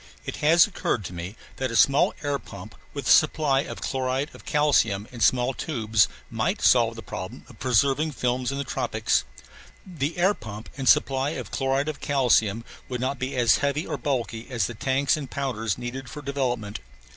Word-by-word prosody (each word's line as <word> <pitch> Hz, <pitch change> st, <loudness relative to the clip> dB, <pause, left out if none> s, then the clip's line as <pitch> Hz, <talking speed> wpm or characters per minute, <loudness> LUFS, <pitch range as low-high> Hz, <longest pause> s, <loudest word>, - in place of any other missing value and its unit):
It -, -, -5 dB
has 165 Hz, +3 st, +6 dB
occurred 145 Hz, -, -2 dB
to 90 Hz, -, -6 dB
me 90 Hz, +4 st, -6 dB, 0.2 s
that 130 Hz, -1 st, -1 dB
a 115 Hz, -, -4 dB
small 135 Hz, +6 st, +4 dB
air 145 Hz, -1 st, 0 dB
pump 100 Hz, -1 st, -11 dB, 0.2 s
with 140 Hz, -3 st, -6 dB
a -, -, +4 dB
supply 150 Hz, -3 st, +4 dB
of 150 Hz, -, -5 dB
chloride 130 Hz, +2 st, -2 dB
of -, -, -14 dB
calcium 115 Hz, -9 st, +2 dB
in 120 Hz, -, -9 dB
small 125 Hz, +2 st, +3 dB
tubes 110 Hz, -8 st, +1 dB, 0.2 s
might -, -, -2 dB
solve -, -, +4 dB
the -, -, -9 dB
problem -, -, -7 dB
of -, -, -16 dB
preserving 135 Hz, +5 st, +2 dB
films 125 Hz, 0 st, -1 dB
in 140 Hz, -, -4 dB
the 140 Hz, -, -1 dB
tropics. -, -, 0 dB, 0.6 s
The 160 Hz, -3 st, -3 dB
air 185 Hz, +4 st, +4 dB
pump 110 Hz, -, -9 dB
and 135 Hz, -2 st, 0 dB
supply 135 Hz, +3 st, +3 dB
of -, -, -7 dB
chloride 135 Hz, +1 st, 0 dB
of 155 Hz, -2 st, -4 dB
calcium 115 Hz, -5 st, +2 dB, 0.2 s
would 125 Hz, -1 st, -3 dB
not 130 Hz, +1 st, -2 dB
be 130 Hz, +1 st, -3 dB
as 120 Hz, -2 st, +4 dB
heavy 140 Hz, +3 st, -1 dB
or -, -, -3 dB
bulky 120 Hz, -5 st, -2 dB
as 120 Hz, -6 st, 0 dB
the 120 Hz, -, -4 dB
tanks 135 Hz, +4 st, +1 dB
and 140 Hz, -4 st, -6 dB
powders 115 Hz, -7 st, -2 dB
needed 125 Hz, +1 st, -6 dB
for 150 Hz, -2 st, -8 dB
development. 125 Hz, -7 st, -2 dB
130 Hz, 190 wpm, -25 LUFS, 115-140 Hz, 0.6 s, has